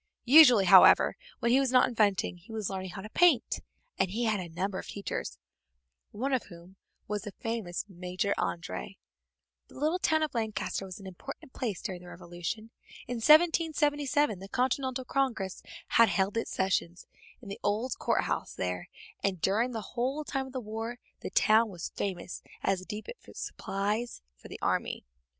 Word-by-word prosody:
Usually, 250 -6 +8
however, 180 - +7 0.3
when 235 - +2
he 260 - +5
was 270 -2 +1
not 255 -1 +5
inventing 205 -6 +1
he 175 +6 -16
was 215 -3 -3
learning 190 -1 -4
how 190 +2 -8
to 215 - -8
paint, 335 -9 +3 0.4
and 190 - +2
he 225 +6 -2
had 220 -3 +1
a 175 -2 -6
number 185 +3 -2
of - - -8
teachers, 200 - -5 0.7
one 265 +6 -2
of 255 - 0
whom 175 +1 -14 0.3
was 210 0 -2
the 200 +1 -8
famous 225 -6 -4
Major 185 +2 -2
André. 175 +3 -4 0.7
The - - -15
little 310 +6 +1
town 315 -3 +2
of 310 - -2
Lancaster 220 -4 -2
was 185 0 -8
an 195 - -12
important 190 +7 -9
place 215 -8 -3
during 180 -2 -5
the 180 - -13
Revolution. 175 +6 -6 0.3
In 245 - -4
1777 295 - +3
the 195 - -9
Continental 260 +1 -1
Congress 240 -9 -1 0.3
had 230 -1 +6
held 195 +1 0
its 230 - -1
sessions 180 -2 -1 0.3
in 240 - -13
the 200 - -6
old 225 +5 -1
court - - +1
house - - -3
there, 90 -1 -3 0.3
and 195 -3 0
during 210 +8 +2
the 220 -5 -6
whole 260 +5 -1
time 270 -2 -3
of 260 - -12
the 260 - -2
war 225 +1 -5 0.2
the - - -5
town 220 +1 +4
was 175 -4 -6
famous 185 -2 -4 0.2
as 195 -1 +1
the 185 - -11
depot 210 - -6 0.2
of - - -13
supplies 210 - -3
for - - -14
the - - -8
army. - - -1
215 Hz, 175 wpm, -30 LUFS, 190-255 Hz, 0.7 s, Usually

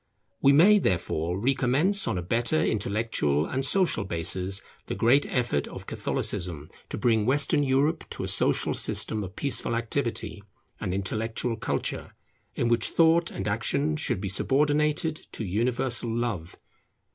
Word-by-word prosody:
We 140 - +6
may, 190 +9 +6
therefore, 85 - -1
recommence 135 - +2
on - - -1
a 90 - -3
better 120 - 0
intellectual 100 -9 0
and 130 +9 -2
social 180 - +3
basis 95 +2 -2 0.2
the - - -3
great 130 +5 +3
effort 120 - -1
of - - -9
Catholicism, 80 -4 -3 0.2
to - - -4
bring 110 -3 +1
Western 145 +2 +3
Europe 145 +4 0
to - - -5
a - - -3
social - - +2
system 110 -1 +1
of 95 -1 -9
peaceful 135 -4 -1
activity 115 -3 -3 0.4
and - - -3
intellectual 110 +5 -2
culture, - - -3 0.4
in 120 - 0
which 120 -1 +2
Thought 165 +1 +3
and - - -5
Action 140 +8 0
should 150 -10 -1
be 100 - -3
subordinated 150 - +1
to 110 - -4
universal 120 +4 -1
Love. 115 -8 -3
120 Hz, 145 wpm, -26 LUFS, 100-140 Hz, 0.4 s, We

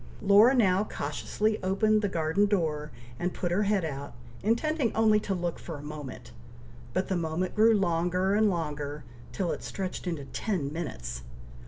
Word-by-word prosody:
Laura 210 +6 +7
now 195 -5 +4
cautiously 215 0 -2
opened 210 +3 +2
the 205 - 0
garden 170 +4 +1
door, 155 -7 0 0.3
and 180 +1 -2
put 175 - -2
her 185 +4 +2
head 200 -4 +1
out, 140 -2 -5 0.3
intending 245 +4 +1
only 220 -1 +4
to 200 -2 -2
look 175 -1 -3
for 165 -3 -7
a 145 - -10
moment, 145 - -8 0.6
but 185 - -1
the 190 - 0
moment 170 +2 -1
grew 220 +1 +5
longer 180 +1 +1
and 215 +1 +4
longer, 150 -4 -3 0.3
till 185 -4 -1
it - - -4
stretched 190 -1 -5
into 160 -5 -3
ten 155 - -2
minutes. 60 - -5
185 Hz, 165 wpm, -28 LUFS, 160-210 Hz, 0.6 s, Laura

